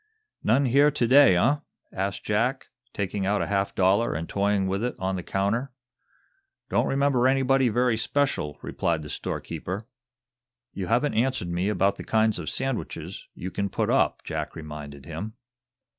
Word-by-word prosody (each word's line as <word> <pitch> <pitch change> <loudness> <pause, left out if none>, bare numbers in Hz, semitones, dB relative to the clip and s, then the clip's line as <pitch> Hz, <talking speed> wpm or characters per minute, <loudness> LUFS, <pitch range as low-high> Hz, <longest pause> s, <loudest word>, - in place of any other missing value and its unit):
"None 130 +6 +3
here 140 +4 +5
to 145 -4 0
day, 135 -7 +7
eh?" 125 +11 +3 0.4
asked 95 +1 -2
Jack, 115 +6 0 0.2
taking 100 0 -2
out 105 +1 +1
a - - -1
half 100 -1 -1
dollar 100 +5 +3
and 80 +2 -3
toying 100 0 +1
with 95 +3 -1
it 125 - -1
on 95 0 -1
the 90 - -3
counter. 100 +9 -1 1.0
"Don't - - +2
remember 135 -2 +2
anybody 135 -1 +3
very 120 +1 +2
special," 125 - 0
replied 80 -2 -1
the 75 - -7
storekeeper. 95 +5 -4 0.9
"You 95 -2 -4
haven't 125 +8 +2
answered 120 -6 0
me 90 +3 0
about 100 -1 +1
the - - -7
kinds 110 -2 +2
of 80 - -4
sandwiches 135 -3 -4
you 95 +2 -6
can 100 +2 -2
put - - 0
up," - - +2
Jack - - -4
reminded 75 -3 -8
him. 90 +8 -6
105 Hz, 160 wpm, -26 LUFS, 95-125 Hz, 1.0 s, day